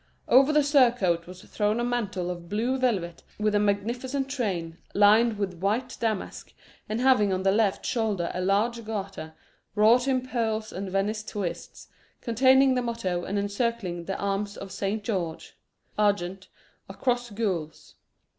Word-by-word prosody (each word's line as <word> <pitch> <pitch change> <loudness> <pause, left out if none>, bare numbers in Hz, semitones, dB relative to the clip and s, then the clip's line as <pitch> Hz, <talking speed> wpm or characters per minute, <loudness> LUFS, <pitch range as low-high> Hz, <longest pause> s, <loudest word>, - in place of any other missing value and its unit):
Over 270 +4 +6
the 300 -1 +4
surcoat 240 - +3
was 180 0 -11
thrown 210 +2 -1
a - - 0
mantle 205 -7 -2
of 175 -1 -8
blue 230 +6 0
velvet 190 -10 -1 0.2
with 215 0 0
a 205 - +3
magnificent 240 +7 -1
train, 185 -11 -3 0.2
lined 215 +2 +5
with 190 -4 -3
white 230 +6 -1
damask, 220 -4 -3 0.4
and 215 +2 -1
having 250 -6 +4
on 185 0 -1
the 195 - +4
left 205 -1 +1
shoulder 210 -7 -1
a 180 - -3
large 215 +5 +1
garter, 195 -7 -6 0.4
wrought 230 +5 +5
in 255 -1 +1
pearls 220 -3 -2
and 190 +1 -5
Venice 205 +3 -1
twists, 205 -4 -6 0.3
containing 260 +3 +4
the 250 - +1
motto, 210 -7 -2
and 200 - -2
encircling 200 -4 -2
the 195 - -3
arms 200 +1 -2
of 195 -1 -8
Saint 200 +2 -2
George 180 -7 -4 0.4
argent, 195 -2 0 0.4
a - - -8
cross 245 -1 0
gules. 190 -8 -4
210 Hz, 155 wpm, -26 LUFS, 190-240 Hz, 0.4 s, Over